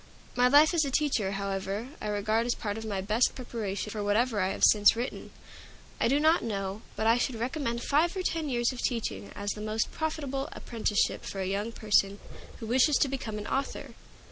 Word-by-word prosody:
My 250 0 +4
life 295 +5 +6
as 330 -2 +3
a 280 - -1
teacher, 255 -9 0
however, 195 +3 -3
I - - -3
regard 215 +3 0
as 240 - +1
part 205 -2 -4
of 225 - -6
my 200 -3 -2
best 215 +5 +1
preparation 220 -5 -4
for 210 -1 -3
whatever 215 +2 +1
I 185 - +2
have - - -4
since 205 0 +6
written. 240 +3 -4 0.7
I - - +3
do 275 +4 +3
not 315 +3 +4
know 200 -2 -3
but 220 - -2
I 230 +2 +4
should 245 0 -1
recommend 235 0 -2
five 335 +6 +2
or 370 - -2
ten 325 -4 -1
years 240 -1 +1
of 255 - -8
teaching 100 - -2
as 205 0 -3
the 210 - -6
most 215 +1 -1
profitable 285 -4 -3
apprenticeship 220 -3 -1
for 195 - -6
a 190 - -1
young 200 +4 -2
person 205 -3 +2 0.4
who 225 - -6
wished 260 +5 +3
to - - +3
become 245 -5 -4
an 210 - -6
author. 270 +4 -3
230 Hz, 205 wpm, -29 LUFS, 205-265 Hz, 0.7 s, life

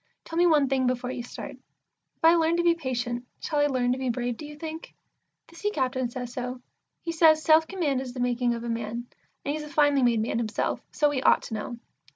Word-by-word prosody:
Tell 330 - -7
me 350 +1 +5
one 300 -4 +4
thing 260 -1 +1
before 250 0 -1
you 250 - -4
start. 240 - -7 0.6
If - - -3
I 330 - +8
learn 335 0 +3
to 345 - +1
be 340 -1 +5
patient, 245 -6 -3 0.2
shall 300 -3 -1
I 290 - +4
learn 250 -3 +1
to 255 - -1
be 260 -1 -1
brave, 245 0 -1
do 300 - -8
you 300 - -10
think? 320 +1 -7 0.5
The 330 - -18
Sea 415 +4 -1
captain 260 - -1
says 245 0 -6
so. 250 0 -4 0.4
He 335 - -2
says, 315 -1 +5
"Self 320 0 +5
command 300 -9 -1
is 260 -2 -6
the - - -5
making 245 -1 +1
of 230 - -6
a - - -4
man," 230 +1 -3 0.4
and 285 - 0
he's 310 - -3
a 300 - -8
finely 290 -1 +3
made 240 -2 +3
man 225 +1 -1
himself, 220 -2 -1
so 295 -1 +2
he 265 -3 -1
ought - - +4
to - - -7
know. 220 +3 -4
260 Hz, 240 wpm, -27 LUFS, 245-310 Hz, 0.6 s, I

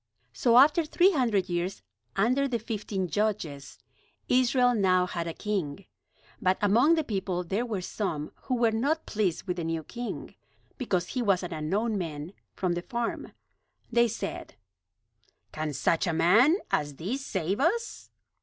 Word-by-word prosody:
So 235 -1 +3
after 295 +5 +6
three 345 +5 +4
hundred 230 - +1
years 175 +1 -3 0.3
under 255 +7 +2
the 245 -3 -1
fifteen 210 -4 -3
Judges, 170 -9 -2 0.5
Israel 250 0 +3
now 185 -4 +3
had 170 -2 -4
a 165 - -3
king. 195 -4 -3 0.6
But 185 -2 +2
among 235 +11 +4
the 320 - 0
people 190 -7 -2
there 200 +8 -2
were 210 -5 -2
some 160 -7 -3 0.2
who 255 - +1
were 235 -2 +3
not 280 +9 0
pleased 200 -6 -1
with 180 -2 -3
the 170 - -2
new 165 0 -2
king, 240 +8 -6 0.5
because 185 -9 -1
he 255 - -2
was 195 -5 +2
an 180 - -5
unknown 200 +8 -1
man 160 0 -5 0.2
from 180 -2 0
the 175 - -2
farm. 235 +3 -4 0.6
They 235 0 +4
said: 205 -3 -5 1.0
"Can 155 0 -3
such 165 +5 +1
a 170 - 0
man 210 - +5
as 145 -1 0
this 225 - -4
save 190 - -2
us?" 440 - -1
205 Hz, 155 wpm, -28 LUFS, 175-245 Hz, 1.0 s, after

